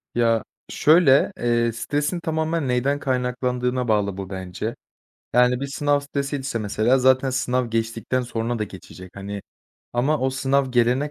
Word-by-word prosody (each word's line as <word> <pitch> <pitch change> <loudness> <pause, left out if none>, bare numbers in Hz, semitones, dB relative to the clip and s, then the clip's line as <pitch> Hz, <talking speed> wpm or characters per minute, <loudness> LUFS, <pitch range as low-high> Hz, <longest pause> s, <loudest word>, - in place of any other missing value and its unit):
Ya, 115 -2 +2 0.3
şöyle, 150 -3 +5
eee, 120 -1 +1
stresin 145 +8 -2
tamamen 160 -2 -1
neden 130 +3 +1
kaynaklandığına 125 -1 -1
bağlı 100 -3 +1
bu 95 -1 -6
bence. 95 +3 -5 0.6
Yani, 125 +1 +4
bir 140 - -2
sınav 145 +1 +1
stresiyse 140 -3 -3
mesela 110 +5 +2
zaten 130 +1 +3
sınav 125 -2 0
geçtikten 115 +2 -1
sonra 120 -1 -3
da 105 - -1
geçecek, 95 -2 -12
hani, 100 0 -6 0.5
ama 135 +6 +1
o 130 - +1
sınav 135 0 +1
gelene 125 +4 +2
125 Hz, 140 wpm, -23 LUFS, 115-140 Hz, 0.6 s, şöyle